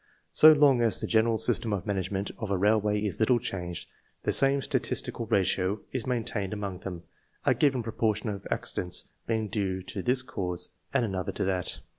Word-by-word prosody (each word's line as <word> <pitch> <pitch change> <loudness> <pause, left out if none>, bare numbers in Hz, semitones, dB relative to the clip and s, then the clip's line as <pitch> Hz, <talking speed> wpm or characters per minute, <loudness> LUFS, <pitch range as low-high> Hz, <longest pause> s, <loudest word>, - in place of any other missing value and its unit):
So 155 - +9
long 145 -5 +5
as 115 -2 +2
the - - -3
general 110 0 +2
system 115 +1 +2
of 95 -4 -2
management 95 0 -2
of 110 - -4
a 100 - +1
railway 105 +1 +2
is 100 - -1
little 120 +2 +4
changed, 90 -7 -5 0.4
the - - +1
same 135 0 +4
statistical 115 - -2
ratio 95 -1 +1
is 130 -3 -3
maintained 110 -5 -2
among 100 -3 -4
them, 90 -3 -7 0.4
a - - +5
given 135 -5 +1
proportion 110 -1 -1
of 100 -1 -6
accidents 90 -1 -2 0.2
being 110 -1 0
due 95 -3 -2
to 95 +1 -5
this 125 +5 +1
cause, 90 -9 -3 0.2
and 130 -3 +2
another 95 -4 -3
to - - -2
that. 95 -2 -2
105 Hz, 180 wpm, -28 LUFS, 95-115 Hz, 0.4 s, So